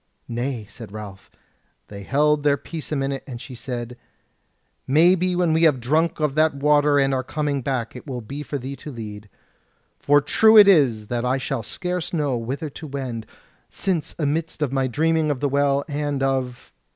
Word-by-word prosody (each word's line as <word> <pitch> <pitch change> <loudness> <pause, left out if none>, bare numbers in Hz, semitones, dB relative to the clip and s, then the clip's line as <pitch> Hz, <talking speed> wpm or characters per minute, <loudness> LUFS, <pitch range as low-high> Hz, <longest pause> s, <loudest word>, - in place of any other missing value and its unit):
"Nay," 120 -1 -3
said 115 -1 -11
Ralph. 100 -2 -9 0.6
They 100 -1 -9
held 150 +7 +2
their 145 -1 +3
peace 160 +3 -8
a - - 0
minute, 135 -1 -2
then 125 -3 -6
she 130 +2 -10
said: 120 0 -6 0.9
"Maybe 180 +5 +4
when 175 -3 +2
we 160 - +2
have 155 -6 +4
drunk 155 +8 +1
of 150 -3 0
that 155 0 +2
Water 145 +1 +3
and 135 -1 +2
are 130 - +1
coming 145 +1 -2
back, 125 -3 -3
it 125 - -10
will 125 -3 -4
be 140 +6 -7
for 145 -1 -4
thee 135 +1 -6
to 150 - -9
lead. 105 -4 -8 0.7
For 145 0 +4
true 220 +10 +5
it 205 -2 +10
is 135 - +4
that 120 -1 -1
I 125 +2 +1
shall 135 -2 -3
scarce 180 - -4
know 145 -6 0
whither 135 +7 -4
to 155 +3 -9
wend; 130 -6 -5 0.4
since 180 -6 -2
amidst 155 +1 -1
of 135 -2 -2
my 135 -1 +1
dreaming 160 +3 +1
of 145 -3 -1
the 145 - +1
Well, 140 0 +1
and 145 -2 -2
of... 130 -2 -2
140 Hz, 190 wpm, -23 LUFS, 125-150 Hz, 0.9 s, it